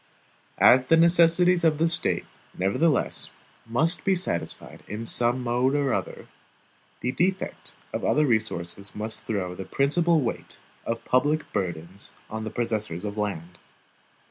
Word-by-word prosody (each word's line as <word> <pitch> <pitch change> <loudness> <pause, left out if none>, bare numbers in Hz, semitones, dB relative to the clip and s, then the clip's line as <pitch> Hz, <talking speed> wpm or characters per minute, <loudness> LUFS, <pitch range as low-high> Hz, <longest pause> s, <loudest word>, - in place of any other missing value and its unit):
As 130 +1 +6
the 165 - +5
necessities 170 +1 +4
of 160 -2 +3
the 165 +2 +2
State, 170 +2 +3 0.3
nevertheless, 125 - +1 0.4
must 160 +10 +1
be 195 - +2
satisfied 175 - -4
in 110 +2 -5
some 120 +2 +2
mode 125 +3 +1
or 140 -4 +1
other, - - -4 0.7
the 125 - -1
defect 185 +8 -2 0.2
of - - -3
other 150 0 +3
resources 100 -5 -2
must 110 +1 -4
throw 95 -5 -2
the 95 - -7
principal 165 - +2
weight 125 -5 -4 0.3
of 115 0 -3
public 145 +5 +1
burdens 90 +1 -4 0.2
on 110 0 -4
the - - -3
possessors 110 -6 -2
of 100 0 -4
land. 90 -5 -4
120 Hz, 140 wpm, -25 LUFS, 105-160 Hz, 0.7 s, As